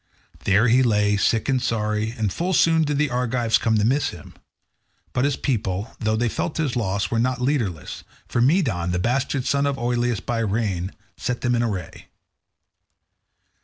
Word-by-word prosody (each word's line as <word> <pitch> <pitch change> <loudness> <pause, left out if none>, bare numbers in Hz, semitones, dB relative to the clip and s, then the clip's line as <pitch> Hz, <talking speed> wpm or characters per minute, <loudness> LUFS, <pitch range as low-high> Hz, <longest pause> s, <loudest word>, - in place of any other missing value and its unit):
There 100 +5 +4
he 125 +3 +5
lay 105 -4 +2
sick 105 +2 +1
and 130 -2 +1
sorry, 105 0 -1
and 105 -4 -1
full 180 +2 -1
soon 165 -1 +4
did 145 -1 -1
the 150 -2 +1
Argives 125 -2 +1
come 110 -2 +1
to 105 - +2
miss 135 +5 +2
him. 85 -5 -11 0.8
But 125 - +1
his 145 -2 +1
people, 105 -6 -2
though 110 0 0
they 120 +2 +1
felt 155 +7 -3
his 150 -6 -1
loss 100 -4 -1
were 115 - +1
not 125 +1 0
leaderless, 120 - -2 0.2
for 120 - 0
Medon, 120 - +2
the - - +1
bastard 125 +6 0
son 140 0 +1
of 140 -1 -1
Oileus 120 -2 0
by 120 -1 -3
Rhene, 100 -4 -1 0.3
set 125 -1 -3
them 120 0 +1
in 120 - +1
array. 100 -8 -4
120 Hz, 175 wpm, -23 LUFS, 105-130 Hz, 0.8 s, he